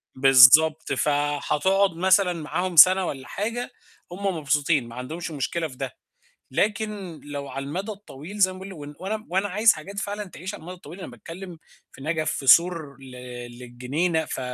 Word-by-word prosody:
بالضبط 135 +4 +6
فهتقعد 145 +8 +1
مثلًا 185 +1 +3
معاهم 175 +3 -3
سَنة 185 +4 +8
والّا 135 -4 -6
حاجة، 230 +4 -4 0.4
هُم 190 -1 -2
مبسوطين 145 -2 +1
ما 115 - -11
عندهمش 160 +7 -6
مشكلة 160 +3 -2
في 130 -4 -14
ده، - - -5 0.6
لكن 205 -5 -2
لو 145 -1 -6
على 135 0 -5
المدى 190 +9 -4
الطويل 200 -2 -10
زي 185 -2 +4
ما 185 - -11
باقول، 195 0 -9
وإن 145 -3 -9
وأنا 215 +3 -4
وأنا 190 +3 0
عايز 210 +4 +4
حاجات 195 +6 -8
فعلًا 205 0 -4
تعيش 190 0 -8
على - - -9
المدى 180 +3 -9
الطويل، 180 +1 -12
أنا - - -7
باتكلِّم 170 - -10 0.3
في - - -15
نجف 155 +1 -1
في 135 - -5
سور 165 -2 +4
ل 135 -1 -13 0.5
للجنينة، 140 +8 -2
ف - - -5
170 Hz, 170 wpm, -24 LUFS, 145-190 Hz, 0.6 s, سَنة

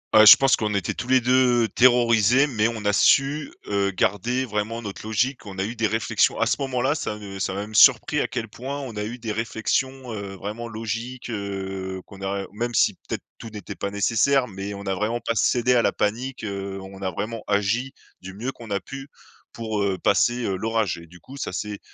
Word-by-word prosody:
Heu, 110 0 +9
je 105 - +12
pense 135 -1 +4
qu'on 105 -1 -2
était 100 -4 -1
tous 125 - -6
les 130 0 +6
2 125 -1 +3
terrorisés, 120 +1 +4
mais 115 -4 +1
on 110 -3 -6
a 105 - +2
su, 140 +7 +3 0.2
heu, 100 -1 +1
garder 115 +7 0
vraiment 110 +1 -3
notre 105 -1 -7
logique. 125 +4 -1
On 100 -2 -9
a 95 - 0
eu 115 +3 -5
des 115 -1 0
réflexions 110 0 +1
à - - +3
ce - - +2
moment-là, 135 +1 0
ça 105 -8 -3
ne 95 -2 -8
ça 95 0 -1
m'a 100 - -3
même 105 +1 -8
surpris 145 +6 +6
à - - 0
quel 120 -3 -4
point 130 +6 -6
on 130 -5 -7
a 105 - -3
eu 120 +4 -6
des 110 -2 -4
réflexions, 120 +3 -2
heu, 100 -2 -6
vraiment 110 +5 -6
logiques, 115 +3 -5
heu, 95 -3 -4
qu'on 100 -1 -13
a 100 0 -2
heu, - - -9
même 120 +3 -3
si, - - +3
peut-être, - - -7
tout 115 - -9
n'était 105 -3 -8
pas 100 - -4
nécessaire, 115 +6 +2
mais 100 0 -6
on 100 0 -8
n'a 95 -1 -1
vraiment 110 +5 -1
pas 115 - -2
cédé 125 +2 +2
à 120 - +4
la - - +2
panique, 120 +4 -2
heu, 100 -1 -5
on 95 0 -11
a 95 -1 -1
vraiment 110 +5 -5
agi 105 +6 0 0.3
du 95 +1 -9
mieux 120 +7 -4
qu'on 115 -3 -12
a 100 - +1
pu 135 +4 -9 0.4
pour, 110 -2 -3
heu, 100 -2 0
passer, 120 +6 +2
heu, 95 - -1
l'orage 110 -1 -1
et 85 - -13
du 90 +2 -16
coup 135 - -13
ça 140 - -4
s'est 105 -1 -4
110 Hz, 225 wpm, -24 LUFS, 100-125 Hz, 0.4 s, je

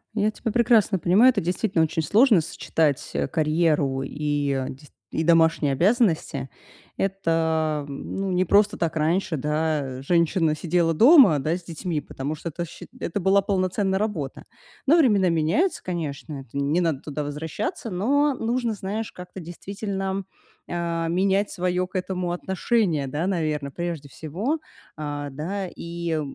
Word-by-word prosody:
Я 210 0 +2
тебя 225 - -4
прекрасно 225 -5 +3
понимаю, 200 +10 +5
это - - -1
действительно 180 0 +1
очень 160 +1 0
сложно 210 - +5
сочетать, 150 -2 -1
а, - - 0
карьеру 155 -3 +1
и 145 0 -2
деc 135 +2 -4 0.2
и 160 - -1
домашние 160 -4 +4
обязанности. 170 - +1 0.5
Это, 160 -5 0
м, 140 - -6
ну, 195 -1 -2
не 180 +1 +2
просто 205 +3 +3
так 165 -1 -1
раньше, 160 +2 +1
да, 150 -3 -1
женщина 165 0 +2
сидела 165 0 +1
дома, 235 - +7
да, 155 +6 0
с 180 - -13
детьми, 165 -1 -3
потому 140 +1 -5
что 155 - -7
это 170 +2 -4
счи - - -11
это 190 +4 -3
была 195 +2 +4
полноценная 190 0 0
работа. 185 -11 -3 0.4
Но 315 - +6
времена 210 - +4
меняются, 165 - +1
конечно, 155 -4 -4
это 130 -4 -13
не 145 +5 +1
надо 160 -6 0
туда 150 0 -4
возвращаться, 160 - -4
но 275 +10 +2
нужно, 235 0 -1
знаешь, 205 +2 -4
как-то 180 +1 -10
действительно, 195 +2 -4 0.5
э, 170 -1 -2
менять 195 +3 +1
своё 180 0 -1
к 190 - -22
этому 180 -1 -2
отношение, 185 - 0
да, 150 +7 -2
наверно, 155 -6 -1
прежде 170 -1 -5
всего, 190 - -3 0.4
а, 145 -1 -4
да, 180 +8 -4
и, 170 -2 -4
170 Hz, 150 wpm, -24 LUFS, 155-195 Hz, 0.5 s, дома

